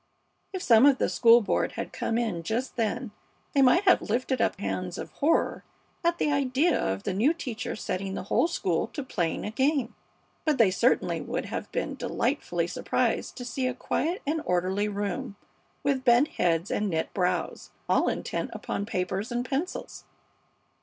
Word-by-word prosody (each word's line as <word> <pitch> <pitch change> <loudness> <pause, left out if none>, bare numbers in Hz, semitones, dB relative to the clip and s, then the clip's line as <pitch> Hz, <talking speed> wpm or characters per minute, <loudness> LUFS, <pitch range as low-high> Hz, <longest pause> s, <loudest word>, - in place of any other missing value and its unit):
If 375 -2 -4
some 230 +3 +7
of 275 -2 +5
the - - +1
school 235 0 +6
board 210 - 0
had - - -5
come 230 - -1
in 220 -8 -1
just 225 +9 -3
then 230 +1 -1 0.4
they 280 - +4
might 270 +9 +5
have 375 - +5
lifted 250 +3 -1
up 225 - +1
hands 185 -3 -3
of - - -6
horror 310 +4 +1 0.4
at 340 0 +2
the 295 - +1
idea 280 +4 +2
of 95 +1 -1
the - - -2
new 250 - +2
teacher 240 -6 -4
setting 195 -1 -3
the - - -4
whole 205 - +2
school 185 - -1
to 285 - -4
playing 175 -10 -2
a 210 - -3
game. 265 +1 +1 0.5
But 305 -3 +1
they 220 -5 +5
certainly 240 +7 +1
would - - -3
have - - -5
been - - -2
delightfully - - -1
surprised - - -1
to 245 - -6
see 255 +1 -2
a 250 - -2
quiet 335 +7 -2
and 310 +2 0
orderly 185 +3 0
room 205 +3 -3 0.5
with 275 -2 +1
bent 245 +3 +5
heads 170 +1 0
and 210 -1 0
knit 160 -2 -2
brows, 180 -1 -1 0.2
all - - +3
intent - - -3
upon 200 - -4
papers 190 +2 -2
and 240 +1 -1
pencils. 295 +7 -4
235 Hz, 175 wpm, -27 LUFS, 195-275 Hz, 0.5 s, some